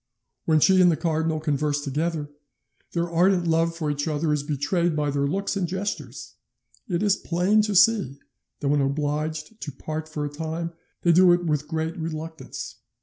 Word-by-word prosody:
When 160 -1 +4
she 185 +4 +5
and 180 -1 +6
the 160 - 0
cardinal 160 0 0
converse 150 -1 -1
together, 150 +1 -2 0.6
their 170 0 0
ardent 175 +2 +3
love 165 0 +1
for 155 -3 -1
each 145 +2 -2
other 155 0 0
is 150 - 0
betrayed 155 +4 0
by 150 -1 0
their 140 0 0
looks 195 +7 -1
and 190 -3 0
gestures; 190 +4 -5 0.5
it 175 +1 0
is 205 -2 +4
plain 185 +5 +2
to 210 -1 -1
see 190 - +4 0.4
that 140 - 0
when 145 0 +3
obliged 150 +7 -2
to 145 - -5
part 155 +3 -6
for 150 -1 -3
a - - -3
time 160 +2 -4 0.3
they 170 - +5
do 180 +1 +6
it 175 0 0
with 150 -2 0
great 160 +1 -2
reluctance. 160 0 -6
160 Hz, 180 wpm, -25 LUFS, 150-175 Hz, 0.6 s, and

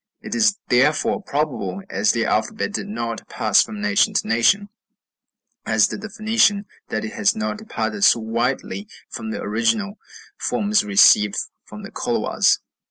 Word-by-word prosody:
It - - -7
is 220 -3 +2
therefore 150 - +2
probable, 130 - -3
as 100 +2 +1
their 115 -2 -1
alphabet 205 - -1
did 205 - -4
not 115 - -5
pass 110 -3 +3
from 215 -1 -5
nation 205 0 +1
to - - 0
nation, 195 - +2 0.9
as - - +3
did - - -7
the 220 - -7
Phoenician, 215 -2 +1 0.2
that - - -3
it 220 - -7
has 225 0 +1
not 215 -1 -3
departed 215 -1 -4
so 120 - +6
widely 120 - -3 0.2
from 225 - -6
the 220 - -4
original 120 - -1 0.4
forms 210 0 +1
received 195 - +5 0.3
from - - -11
the - - -9
Colhuas. - - +1
200 Hz, 155 wpm, -21 LUFS, -, 0.9 s, so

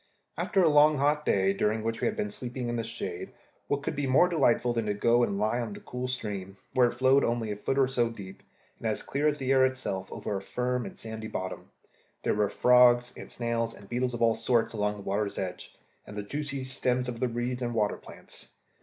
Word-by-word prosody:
After 195 -3 +1
a - - +5
long 150 0 +6
hot 150 +2 +1
day, 95 0 +3
during 105 +2 0
which 115 0 -2
we - - +2
had 220 - -1
been 210 -1 -2
sleeping 125 -9 -5
in 120 - -1
the 115 - -1
shade, 115 +1 -5 0.3
what 140 0 -1
could - - -2
be 145 -1 -1
more 135 +7 +5
delightful 125 -7 +2
than 115 -2 -1
to 105 - 0
go 115 +3 +3
and 100 -4 +1
lie 110 +4 +1
in 110 -3 -4
the - - -8
cool 125 0 -5
stream, 100 -6 -5 0.2
where 125 -1 +5
it 120 - -3
flowed 130 +2 +4
only 115 -2 0
a - - -2
foot 135 +6 -2
or 135 -1 +4
so 120 -3 +1
deep, 100 -4 -10 0.4
and - - -3
as - - -2
clear 145 +2 0
as 150 -1 +1
the 135 -2 -1
air 135 -1 +5
itself, 130 -8 -2
over 105 - -4
a 95 - -3
firm 125 +3 -2
sandy 110 -1 -7
bottom? 95 -3 -5 0.5
There - - +2
were 105 -1 +1
frogs, 125 0 +5
and - - -9
snails, 115 -1 -2
and 100 - -14
beetles 125 +1 -1
of 120 - -1
all 115 -1 +5
sorts, 115 -1 +1
along 105 -1 0
the 105 - -9
water's 100 +1 -2
edge, 90 -1 -5 0.3
and 105 - -9
the 105 - -3
juicy 140 +4 -4
stems 125 -1 0
of 120 -2 -5
the 125 - +1
reeds 120 +1 -3
and 120 -1 -2
water 105 -2 +1
plants. - - -12
120 Hz, 235 wpm, -28 LUFS, 105-130 Hz, 0.5 s, long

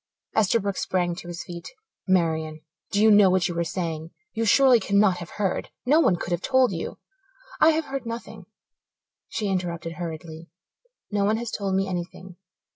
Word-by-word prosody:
Esterbrook 200 -2 +2
sprang 175 -2 0
to 175 - -9
his 175 -1 -6
feet. 170 0 -8 0.4
"Marian, 160 -4 +1 0.3
do 200 - +1
you 220 +1 +6
know 205 -2 +7
what 185 -1 +2
you 175 - -4
are - - +2
saying? 165 -2 -4 0.2
You 230 - -1
surely 255 +1 +6
cannot 200 -2 +3
have 170 -1 -8
heard 195 -3 -1 0.2
no 295 +5 +5
one 190 - +4
could 175 - -6
have 175 0 0
told 260 -1 +3
you 165 -3 -5 0.3
" - - -21
"I 315 - +8
have 315 0 -1
heard 270 -4 -5
nothing," 230 +1 -7 0.8
she 210 - -2
interrupted 175 -3 -2
hurriedly. 165 -1 -7 0.6
"No 205 -1 +1
one 215 +2 +2
has 235 -1 -4
told 195 -2 -2
me 195 0 +1
anything. 180 0 -6
190 Hz, 180 wpm, -25 LUFS, 170-220 Hz, 0.8 s, I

